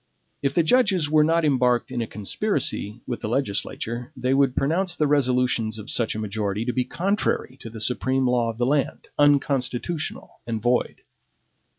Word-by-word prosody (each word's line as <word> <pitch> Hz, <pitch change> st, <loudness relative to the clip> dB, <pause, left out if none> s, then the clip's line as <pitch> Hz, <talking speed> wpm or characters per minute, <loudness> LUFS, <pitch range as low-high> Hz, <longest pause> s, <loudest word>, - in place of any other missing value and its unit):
If 140 Hz, 0 st, -1 dB
the 170 Hz, -, +4 dB
judges 190 Hz, -6 st, +3 dB
were 155 Hz, -1 st, +5 dB
not 165 Hz, +1 st, +2 dB
embarked 125 Hz, -3 st, +2 dB
in 125 Hz, -2 st, -2 dB
a 115 Hz, -, -3 dB
conspiracy 110 Hz, -, -2 dB
with 120 Hz, -, -4 dB
the 105 Hz, -, -3 dB
legislature, 120 Hz, +1 st, -2 dB
they 130 Hz, +1 st, 0 dB
would 135 Hz, -2 st, +3 dB
pronounce 175 Hz, +6 st, +1 dB
the 155 Hz, -, +1 dB
resolutions 125 Hz, -6 st, +1 dB
of 105 Hz, -, -7 dB
such 115 Hz, -3 st, 0 dB
a -, -, -3 dB
majority 105 Hz, 0 st, -2 dB
to 125 Hz, -, -1 dB
be 125 Hz, 0 st, 0 dB
contrary 195 Hz, -8 st, -1 dB
to 115 Hz, -, -8 dB
the 110 Hz, 0 st, -9 dB
supreme 130 Hz, +3 st, +1 dB
law 120 Hz, -2 st, +1 dB
of 115 Hz, -, -6 dB
the 120 Hz, -, +1 dB
land, 140 Hz, +1 st, -1 dB
unconstitutional, 145 Hz, +1 st, 0 dB
and 115 Hz, -2 st, -2 dB
void. 120 Hz, +3 st, 0 dB
125 Hz, 175 wpm, -24 LUFS, 115-150 Hz, -, were